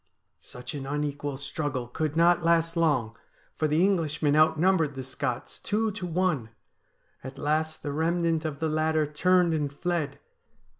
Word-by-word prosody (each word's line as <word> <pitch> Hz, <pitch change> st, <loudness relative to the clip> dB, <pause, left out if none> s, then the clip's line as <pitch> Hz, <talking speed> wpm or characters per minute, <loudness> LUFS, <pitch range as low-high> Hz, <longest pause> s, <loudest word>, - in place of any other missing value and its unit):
' -, -, -51 dB
Such 125 Hz, -, -9 dB
an 135 Hz, -2 st, -5 dB
unequal 145 Hz, -1 st, -3 dB
struggle 140 Hz, -2 st, -3 dB
could 155 Hz, +4 st, -3 dB
not 170 Hz, +1 st, +4 dB
last 165 Hz, 0 st, +2 dB
long, 135 Hz, -9 st, +1 dB, 0.4 s
for 155 Hz, -, 0 dB
the 155 Hz, +5 st, +3 dB
Englishmen 155 Hz, -6 st, +1 dB
outnumbered 160 Hz, 0 st, +3 dB
the 135 Hz, -, -5 dB
Scots 125 Hz, -2 st, -4 dB
two 220 Hz, +1 st, 0 dB
to 185 Hz, -3 st, -5 dB
one. 170 Hz, -9 st, 0 dB, 0.7 s
At 130 Hz, +1 st, -8 dB
last 155 Hz, +2 st, -1 dB
the 145 Hz, -, -3 dB
remnant 165 Hz, +1 st, 0 dB
of 155 Hz, -3 st, -3 dB
the 160 Hz, -, -1 dB
latter 155 Hz, 0 st, +1 dB
turned 175 Hz, +3 st, +2 dB
and 150 Hz, -3 st, -1 dB
fled. 150 Hz, -2 st, -2 dB
155 Hz, 155 wpm, -27 LUFS, 145-170 Hz, 0.7 s, not